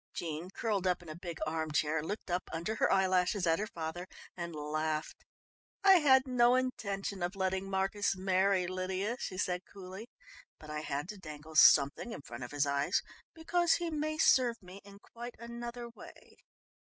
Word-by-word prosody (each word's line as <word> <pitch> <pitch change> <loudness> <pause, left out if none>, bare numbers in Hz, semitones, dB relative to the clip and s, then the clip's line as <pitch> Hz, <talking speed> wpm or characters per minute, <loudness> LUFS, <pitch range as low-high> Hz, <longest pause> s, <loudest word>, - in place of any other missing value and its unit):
Jean, 165 +1 -4
curled 200 -2 -1
up 180 -1 0
in 170 - -12
a 155 - -6
big 170 -1 -7
arm 160 0 -2
chair, 150 +1 +1
looked 195 +3 -5
up 180 +1 -1
under 170 +7 -3
her - - +2
eyelashes 185 0 +2
at 165 +1 +3
her 215 - -2
father 170 0 -5 0.3
and 170 -2 -5
laughed. 155 +1 -3 0.6
"I 385 -2 +8
had 265 -3 +5
no 245 -1 +4
intention 200 -7 -2
of 175 +3 -2
letting 190 0 -1
Marcus 195 +1 0
marry 190 0 +2
Lydia," 185 +5 -2
she 185 - -5
said 180 -1 -1
coolly, 195 +4 -9 0.5
"but 155 -1 -10
I 150 - -3
had 145 0 -3
to 210 - -7
dangle 155 -2 -10
something 145 +8 +6
in 145 - -8
front 120 -1 -8
of 125 - -6
his 145 0 +1
eyes, 140 0 +1 0.3
because 340 +1 +2
he 340 -1 -1
may 310 0 -2
serve 250 -6 +4
me 185 +2 -11
in 200 0 -14
quite 235 +3 -9
another 235 +1 -6
way." 235 - -14
185 Hz, 180 wpm, -32 LUFS, 160-230 Hz, 0.6 s, I